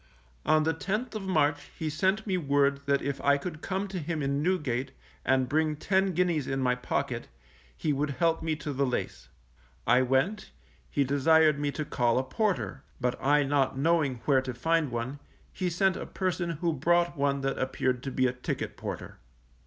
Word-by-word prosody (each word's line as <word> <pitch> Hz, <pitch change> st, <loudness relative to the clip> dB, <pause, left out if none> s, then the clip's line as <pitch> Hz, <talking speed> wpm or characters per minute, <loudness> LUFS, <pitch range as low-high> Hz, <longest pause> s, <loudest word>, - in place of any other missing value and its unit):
_ -, -, -4 dB
On 155 Hz, 0 st, +5 dB
the 160 Hz, +1 st, +1 dB
10th 210 Hz, +10 st, -3 dB
of 215 Hz, -, -4 dB
March 155 Hz, -6 st, +1 dB
he 160 Hz, -, -3 dB
sent 190 Hz, +7 st, +1 dB
me 195 Hz, -3 st, 0 dB
word 140 Hz, -4 st, +2 dB
that 140 Hz, 0 st, +2 dB
if 140 Hz, 0 st, -3 dB
I 140 Hz, 0 st, +4 dB
could 155 Hz, +1 st, -6 dB
come 195 Hz, +1 st, -2 dB
to 190 Hz, -1 st, -4 dB
him 160 Hz, -1 st, -3 dB
in 140 Hz, +1 st, 0 dB
Newgate, 140 Hz, -7 st, -1 dB, 0.3 s
and 130 Hz, -1 st, +2 dB
bring 155 Hz, +3 st, +1 dB
ten 190 Hz, +4 st, +1 dB
guineas 170 Hz, -5 st, +1 dB
in 135 Hz, -, -1 dB
my 125 Hz, -1 st, +2 dB
pocket, 125 Hz, 0 st, -2 dB, 0.5 s
he 150 Hz, -, 0 dB
would 145 Hz, +2 st, 0 dB
help 160 Hz, +5 st, +1 dB
me 160 Hz, -1 st, -1 dB
to 150 Hz, -1 st, -5 dB
the 140 Hz, +1 st, 0 dB
lace. -, -, -3 dB, 0.6 s
I 125 Hz, +1 st, +5 dB
went, 135 Hz, +12 st, +1 dB, 0.4 s
he 140 Hz, -, +1 dB
desired 145 Hz, +2 st, +4 dB
me 145 Hz, 0 st, 0 dB
to 155 Hz, -, -3 dB
call 120 Hz, -4 st, +1 dB
a 130 Hz, -, +2 dB
porter, 170 Hz, -1 st, -1 dB, 0.2 s
but 125 Hz, -1 st, 0 dB
I 145 Hz, +2 st, +4 dB
not 135 Hz, -1 st, +1 dB
knowing 145 Hz, -5 st, +1 dB
where 135 Hz, -3 st, +4 dB
to 130 Hz, -1 st, -5 dB
find 160 Hz, +3 st, +1 dB
one, 120 Hz, +4 st, -4 dB, 0.3 s
he 185 Hz, -1 st, -1 dB
sent 185 Hz, +2 st, +2 dB
a -, -, -5 dB
person 185 Hz, -2 st, -2 dB
who 165 Hz, +1 st, -1 dB
brought 175 Hz, +4 st, +2 dB
one 140 Hz, -1 st, 0 dB
that 135 Hz, 0 st, -1 dB
appeared 130 Hz, -1 st, 0 dB
to 135 Hz, -, -5 dB
be 130 Hz, 0 st, +1 dB
a 125 Hz, -, +1 dB
ticket 125 Hz, -, -4 dB
porter. -, -, -6 dB
145 Hz, 195 wpm, -29 LUFS, 135-170 Hz, 0.6 s, On